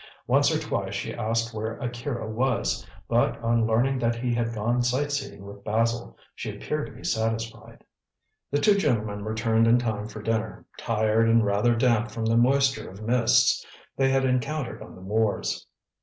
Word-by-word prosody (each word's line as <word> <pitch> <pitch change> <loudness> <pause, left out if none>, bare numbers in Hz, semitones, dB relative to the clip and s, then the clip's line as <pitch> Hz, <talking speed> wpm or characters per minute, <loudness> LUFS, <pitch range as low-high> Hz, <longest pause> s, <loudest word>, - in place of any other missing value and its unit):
Once - - +4
or - - +2
twice - - -3
she - - -3
asked 115 +1 -1
where 110 +1 -4
Akira 120 -1 -4
was, 115 -1 0 0.2
but 120 +1 +1
on 115 -1 +2
learning 125 +4 +2
that 115 0 +1
he 120 +1 -1
had 115 -1 0
gone 115 +3 0
sightseeing 135 -3 -2
with 100 0 -11
Basil, 115 +2 -1 0.2
she - - -6
appeared - - -3
to - - -11
be - - -13
satisfied. 115 0 -3 0.7
The 145 - +1
two 200 +7 +4
gentlemen 105 - 0
returned 110 +1 +1
in 120 +1 +6
time 110 -3 -2
for 110 -1 -9
dinner, 110 -1 -2
tired 110 0 +2
and 115 -1 +4
rather 105 +4 +2
damp 115 -1 +2
from 110 +1 -4
the 115 +1 +2
moisture 130 -1 +3
of 100 +3 -10
mists 120 +1 +3 0.3
they 135 0 +2
had 135 0 +2
encountered 130 +2 -1
on - - -10
the - - -13
moors. 105 - -1
115 Hz, 170 wpm, -26 LUFS, 110-120 Hz, 0.7 s, in